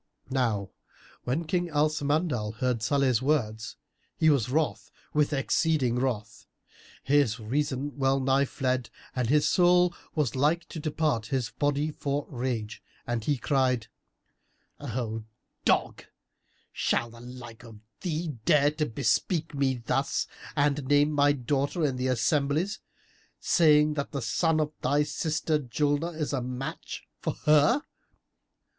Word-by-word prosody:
Now 110 -7 0 0.5
when 140 +7 -1
King 175 +2 -1
Al 150 0 +3
Samandal 145 -7 -1
heard 125 -1 -1
Salih's 130 -1 +2
words, 115 -6 -1 0.4
he 160 -1 +5
was 125 -5 +1
wroth 155 +3 -1 0.2
with 150 0 +2
exceeding 135 -3 +1
wrath; 120 -5 -3 0.6
his 135 -5 +2
reason 140 +4 -2
well 135 0 +2
nigh 135 +1 +2
fled 130 -3 -2 0.3
and 125 -3 0
his 150 +1 +4
soul 180 0 +4 0.2
was 145 -7 0
like 155 +6 +1
to 165 - -6
depart 150 -7 -1
his 125 -3 -1
body 145 +1 0
for 145 -1 -2
rage, 120 -4 -3 0.2
and 120 -2 -2
he 145 -2 +1
cried, 125 -4 +1 0.9
"O 115 -2 -4 0.4
dog, - - +1 0.7
shall 120 - 0
the 115 - -13
like 120 -2 -10
of 110 -3 -12 0.2
thee 165 -1 -2
dare 145 +2 +4
to 150 0 -2
bespeak 140 - 0
me 135 -4 0
thus 135 +3 0 0.3
and 145 -2 +1
name 145 +1 +4
my 145 -1 +4
daughter 140 +4 0
in 135 -3 -1
the 130 +1 -1
assemblies,[FN#328] 145 - +1 0.6
saying 150 -2 +4
that 140 -1 -3
the 140 -3 -2
son 160 +8 +1
of 150 0 -1
thy 145 +3 +2
sister 155 0 -1
Julnar 145 +5 -1
is 150 -1 -2
a 135 - 0
match 125 +2 -5 0.2
for - - -2
her? 150 - +5
140 Hz, 135 wpm, -28 LUFS, 125-150 Hz, 0.9 s, he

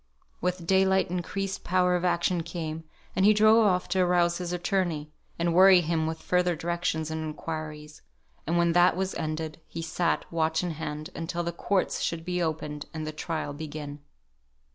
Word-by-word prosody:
With 180 -1 -2
daylight 190 0 +3
increased 195 +2 -3
power 180 0 +2
of 175 - -1
action 175 0 +1
came; 160 -1 -5 0.3
and 190 - +2
he 210 +1 +6
drove 215 +2 +6
off 180 -2 +1
to 185 +1 +1
arouse 175 -1 +3
his 175 -1 -4
attorney, 175 -4 -1 0.3
and 170 0 0
worry 185 0 +7
him 160 -1 0
with 160 0 -5
further 180 -1 +2
directions 165 -1 -2
and 160 0 -3
inquiries; 155 -1 -6 0.5
and 170 +2 +1
when 170 0 +3
that 175 +1 +5
was 190 0 -1
ended, 155 0 -4
he 165 - -6
sat, 165 +1 0
watch 160 0 +1
in 175 - -1
hand, 155 -1 -5
until 170 +1 -3
the 170 - -2
courts 185 +3 -1
should 165 -1 -2
be 180 0 -1
opened, 150 -2 -3
and 155 -1 -3
the 155 - -3
trial 155 -1 -4
begin. 150 -1 -7
170 Hz, 175 wpm, -27 LUFS, 160-180 Hz, 0.5 s, worry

